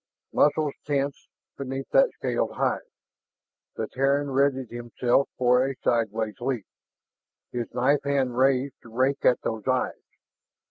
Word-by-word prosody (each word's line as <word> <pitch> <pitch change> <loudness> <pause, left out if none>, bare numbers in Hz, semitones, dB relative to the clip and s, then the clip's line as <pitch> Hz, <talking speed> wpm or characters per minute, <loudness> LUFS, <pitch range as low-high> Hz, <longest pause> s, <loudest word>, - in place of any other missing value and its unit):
Muscles 150 -1 +3
tensed 140 -1 -2 0.3
beneath 135 0 -4
that - - +5
scaled - - -1
hide. - - 0 1.0
The - - -3
Terran 140 +2 +1
readied 135 -2 +1
himself 120 +2 0
for 125 0 +4
a 135 0 -2
sidewise 110 -1 0
leap, 120 -5 -2 0.9
his 120 -1 -4
knife 135 +3 +3
hand 135 -3 0
raised 135 +1 +2
to 115 - -14
rake 130 +4 0
at 125 - +4
those 110 -2 -4
eyes. - - +2
130 Hz, 130 wpm, -26 LUFS, 120-140 Hz, 1.0 s, that